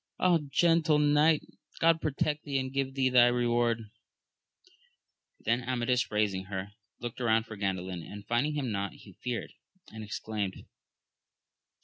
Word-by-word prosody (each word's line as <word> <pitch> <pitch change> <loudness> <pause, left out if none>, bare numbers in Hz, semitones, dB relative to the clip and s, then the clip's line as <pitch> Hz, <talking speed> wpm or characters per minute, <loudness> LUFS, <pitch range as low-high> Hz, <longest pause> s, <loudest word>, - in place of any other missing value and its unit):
Ah, 180 -2 +4
gentle 165 0 +4
knight, 150 +1 +4 0.4
God 165 0 +4
protect 150 0 -1
thee 140 -2 -1
and 130 0 -2
give 135 -1 -1
thee 130 -1 +2
thy 125 -1 +6
reward! 120 -2 +1 1.5
Then 120 +2 +1
Amadis 125 0 0
raising 100 -3 0
her, 95 0 -5 0.3
looked 120 0 -6
round 115 -2 +2
for 110 - -8
Gan 100 -2 0
dalin, 90 -2 -6
and 105 0 -9
finding 120 +7 0
him 135 -5 -1
not, 100 -1 -2
he 100 - -15
feared, 125 -2 -4 0.4
and 110 0 -8
exclaimed. 105 -2 -4
120 Hz, 140 wpm, -30 LUFS, 105-140 Hz, 1.5 s, thy